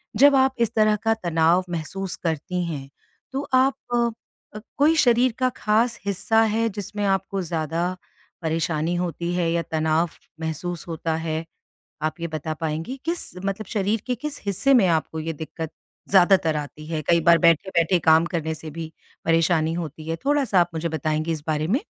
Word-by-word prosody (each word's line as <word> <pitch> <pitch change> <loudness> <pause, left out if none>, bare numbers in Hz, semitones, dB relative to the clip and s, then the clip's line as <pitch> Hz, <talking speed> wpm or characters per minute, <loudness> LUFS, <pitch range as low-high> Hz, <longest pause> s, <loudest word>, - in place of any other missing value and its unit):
जब 285 +1 +6
आप 265 0 +3
इस 230 -1 +1
तरह 215 -1 +4
का 225 - +3
तनाव 170 -3 +2
महसूस 175 +3 -4
करती 170 +2 -1
हैं, 140 -5 -5 0.4
तो 270 - -2
आप 260 +1 +4 0.2
अ 235 0 +3 0.5
अ, 215 - -5 0.2
कोई 305 +3 +4
शरीर 250 -4 +4
का 255 0 +3
ख़ास 220 +2 +1
हिस्सा 200 +3 +2
है 230 +1 +2
जिसमें 205 0 -5
आपको 195 0 0
ज़्यादा, 170 +1 -2 0.5
परेशानी 160 0 -1
होती 175 0 -2
है 175 -2 +1
या 170 0 +1
तनाव 160 +1 0 0.3
महसूस 165 +2 -4
होता 160 -1 -2
है, 160 0 -2 0.6
आप 155 +2 -2
ये 170 - -1
बता 155 0 -4
पाएँगी? 160 - -3
किस 335 +1 -3
मतलब 195 +2 -3
शरीर 205 +2 -1
के 250 - 0
किस 285 +4 -6
हिस्से 235 +8 +3
में 230 -7 +5
आपको 160 -1 0
ये 165 +1 -3
दिक्कत, 160 +1 -6 0.4
ज़्यादातर 180 -4 +4
आती 150 +1 -6
है? 155 -1 -3
कई 170 +3 +3
बार 170 +1 +6
बैठे-बैठे 170 +1 +3
काम 160 0 +5
करने 160 -2 -2
से 155 0 -8
भी 160 +1 -7 0.3
परेशानी 165 -1 +2
होती 160 -2 -6
है। 165 - -1
थोड़ा-सा 275 -9 +3
आप 175 0 +1
मुझे 165 +1 -1
बताएँगी 155 +1 -1
इस 155 -2 -4
बारे 155 -1 0
में? 250 +8 +2
170 Hz, 175 wpm, -24 LUFS, 160-210 Hz, 0.6 s, जब